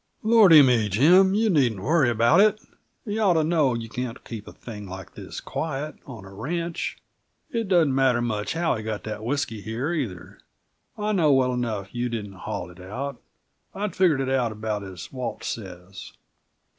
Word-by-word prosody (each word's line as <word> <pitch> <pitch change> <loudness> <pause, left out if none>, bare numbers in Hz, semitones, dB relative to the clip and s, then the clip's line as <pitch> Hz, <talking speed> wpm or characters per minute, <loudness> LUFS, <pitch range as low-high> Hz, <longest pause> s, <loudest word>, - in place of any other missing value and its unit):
"Lordy 210 -9 +8
me! 120 -5 +3
Jim, 180 - +5
you 220 +2 +2
needn't 120 - +1
worry 150 -3 +3
about 120 - +4
it; 215 0 +4 0.5
you 215 0 -2
ought 195 -4 +4
to 160 - +3
know 155 -6 +2
you 115 -1 -5
can't 125 +1 -6
keep 110 -3 -8
a - - -8
thing 105 -4 -9
like 95 -1 -9
this - - -8
quiet, 155 -1 -4
on 115 -8 -9
a 95 - -12
ranch. 165 - -3 0.5
It 230 -4 -2
doesn't 170 -7 +3
matter 130 -2 +3
much 110 -3 -2
how 165 0 +1
he 110 - -5
got 110 -1 -4
that 110 0 -6
whisky 120 -4 -2
here, 120 +10 -3
either; 110 - -5 0.6
I 210 0 -1
know 165 -8 +3
well 130 -2 +3
enough 110 -6 -3
you 120 0 -2
didn't 105 -4 -5
haul 90 -2 -6
it 90 - -16
out. 125 +8 -6 0.5
I'd 205 -2 -3
figured 170 -7 +3
it 130 - -2
out 130 -4 +1
about 110 -1 -3
as 95 -3 -9
Walt 125 -3 -5
says. 95 -3 -7
125 Hz, 180 wpm, -25 LUFS, 110-165 Hz, 0.6 s, Lordy